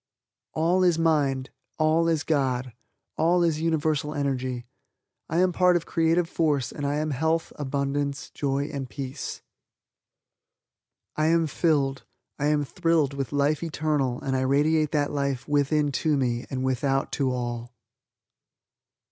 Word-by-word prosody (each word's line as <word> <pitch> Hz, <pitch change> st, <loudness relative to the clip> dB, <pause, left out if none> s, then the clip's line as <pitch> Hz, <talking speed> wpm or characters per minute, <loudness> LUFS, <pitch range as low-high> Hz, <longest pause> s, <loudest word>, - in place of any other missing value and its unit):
All 170 Hz, +4 st, +2 dB
is 175 Hz, -3 st, +4 dB
mind, 140 Hz, -5 st, +1 dB, 0.3 s
all 160 Hz, +2 st, +3 dB
is 160 Hz, -2 st, +1 dB
God, 130 Hz, -5 st, 0 dB, 0.5 s
all 175 Hz, +2 st, +3 dB
is 160 Hz, -2 st, +1 dB
universal 155 Hz, -2 st, 0 dB
energy. 130 Hz, -3 st, -2 dB, 0.6 s
I 160 Hz, -, -1 dB
am 185 Hz, +1 st, +4 dB
part 180 Hz, 0 st, +4 dB
of 170 Hz, -, 0 dB
creative 165 Hz, +1 st, +2 dB
force 150 Hz, -6 st, 0 dB
and 145 Hz, -1 st, -3 dB
I 145 Hz, -, 0 dB
am 155 Hz, +1 st, -1 dB
health, 160 Hz, +4 st, 0 dB
abundance, 140 Hz, 0 st, -2 dB
joy 140 Hz, +1 st, -2 dB
and 135 Hz, -3 st, -4 dB
peace. 135 Hz, 0 st, -6 dB, 1.7 s
I 155 Hz, 0 st, +1 dB
am 165 Hz, 0 st, +3 dB
filled, 140 Hz, -3 st, 0 dB, 0.4 s
I 145 Hz, -, +1 dB
am 150 Hz, -1 st, +2 dB
thrilled 165 Hz, -3 st, +1 dB
with 135 Hz, -3 st, -4 dB
Life 145 Hz, +1 st, +1 dB
Eternal 150 Hz, -6 st, -1 dB
and 135 Hz, -1 st, -1 dB
I 130 Hz, -, +1 dB
radiate 150 Hz, +3 st, +2 dB
that 145 Hz, -1 st, +1 dB
life 140 Hz, -3 st, -2 dB
within 145 Hz, 0 st, +2 dB
to 155 Hz, -3 st, +2 dB
me 120 Hz, -2 st, -1 dB
and 130 Hz, -1 st, -3 dB
without 135 Hz, +1 st, 0 dB
to 135 Hz, -3 st, 0 dB
all. 120 Hz, -1 st, -4 dB
145 Hz, 140 wpm, -26 LUFS, 135-160 Hz, 1.7 s, is